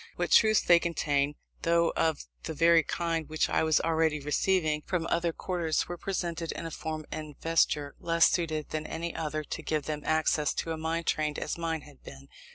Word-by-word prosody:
What - - -2
truths 215 -1 +6
they 175 -1 +6
contained, 145 -4 0 0.3
though 170 0 +2
of 160 -3 0 0.2
the 160 - -4
very 165 +2 +5
kind 165 -1 -2
which 155 0 0
I - - +2
was 160 -1 +3
already 160 -2 +1
receiving 155 +1 +1
from 175 0 -2
other 170 0 +1
quarters, 165 -2 -1
were 175 - -4
presented 170 -3 -3
in 170 - -6
a 165 - -5
form 155 0 -5
and 155 -2 -7
vesture 150 -3 +1
less 165 0 +4
suited 155 -3 -1
than 155 0 -3
any 170 +1 -4
other 155 -1 -3
to 160 - -5
give 155 -1 -1
them 150 0 -4
access 155 -1 +1
to 165 - -2
a - - -1
mind 165 +1 -2
trained 150 -1 0
as - - -3
mine 165 -2 -2
had 145 -2 -16
been. 70 0 -12
160 Hz, 195 wpm, -29 LUFS, 155-170 Hz, 0.3 s, truths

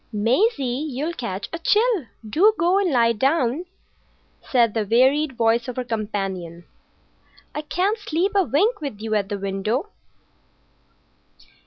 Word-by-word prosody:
"Maisie, 255 - +1
you'll 295 +6 -3
catch 200 - -5
a 335 - -3
chill. 425 - +2 0.2
Do 400 - +4
go 355 +4 +3
and 390 -3 +1
lie 235 -3 +4
down," 270 +5 +1 0.8
said 235 -4 +2
the 220 - 0
wearied 260 +7 +3
voice 230 +1 +2
of 250 - -5
her 255 - -2
companion. 195 -7 -4 0.9
"I 300 - -3
can't 375 +8 -1
sleep 390 -1 -1
a 400 - +4
wink 380 - +1
with 275 -9 -5
you 220 0 -3
at 205 -2 0
the 205 - -2
window." 200 - -2
255 Hz, 140 wpm, -22 LUFS, 215-335 Hz, 0.9 s, Do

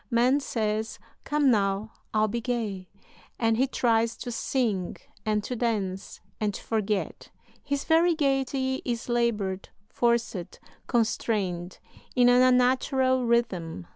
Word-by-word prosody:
Man 250 +3 +3
says: 220 -4 -2 0.3
'Come 295 -3 +3
now, 200 0 0 0.2
I'll 215 0 +2
be 235 +3 -3
gay'; 220 -7 -3 0.5
and 225 -1 +2
he 260 +4 +2
tries 230 -3 +1
to 245 - -6
sing 225 -6 -1 0.3
and 210 -1 +1
to 250 - -4
dance 205 -5 -2 0.2
and 210 -2 -1
to - - -8
forget. 210 -2 -2 0.3
His 285 -1 -2
very 330 +1 +4
gaiety 270 -2 0
is 235 -1 -3
labored, 215 -6 0 0.2
forced, 235 -6 -1 0.3
constrained, 200 -6 -1 0.4
in 245 -1 +5
an 245 0 +6
unnatural 255 0 +3
rhythm. 185 - 0
235 Hz, 125 wpm, -27 LUFS, 210-255 Hz, 0.5 s, an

